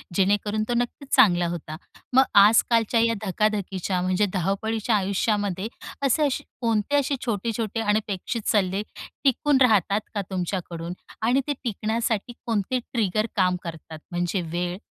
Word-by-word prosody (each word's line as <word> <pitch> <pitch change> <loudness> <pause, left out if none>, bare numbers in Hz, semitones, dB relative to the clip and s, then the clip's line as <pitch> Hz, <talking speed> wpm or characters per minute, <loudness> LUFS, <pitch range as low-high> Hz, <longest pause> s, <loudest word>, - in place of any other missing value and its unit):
जेणेकरून 205 +3 +1
तो - - +1
नक्कीच 245 +3 -3
चांगला 180 -9 +5
होता. 160 -2 -6 0.4
मग 265 +1 +7 0.2
आजकालच्या 225 +2 +4
या 230 0 +3
धकाधकीच्या 195 -2 -1
म्हणजे 185 +3 +2
धावपळीच्या 210 +5 0
आयुष्यामध्ये 200 0 0 0.4
असे-असे 290 +1 +1 0.2
कोणते 230 +3 +1
असे 280 0 0
छोटे-छोटे 225 0 -2
अनपेक्षित 210 +1 -1
सल्ले 195 -1 +1 0.4
टिकून 285 +1 +3
राहतात 210 -4 +4
का 205 - -1
तुमच्याकडून? 175 -2 -4 0.3
आणि 245 +5 +3
ते 290 - +1
टिकण्यासाठी 225 0 -1
कोणते 230 +2 0
ट्रिगर 215 -4 -1
काम 185 -3 +3
करतात? 160 -1 -8
म्हणजे 175 +2 -1
वेळ, 175 +2 -3
210 Hz, 125 wpm, -25 LUFS, 185-230 Hz, 0.4 s, मग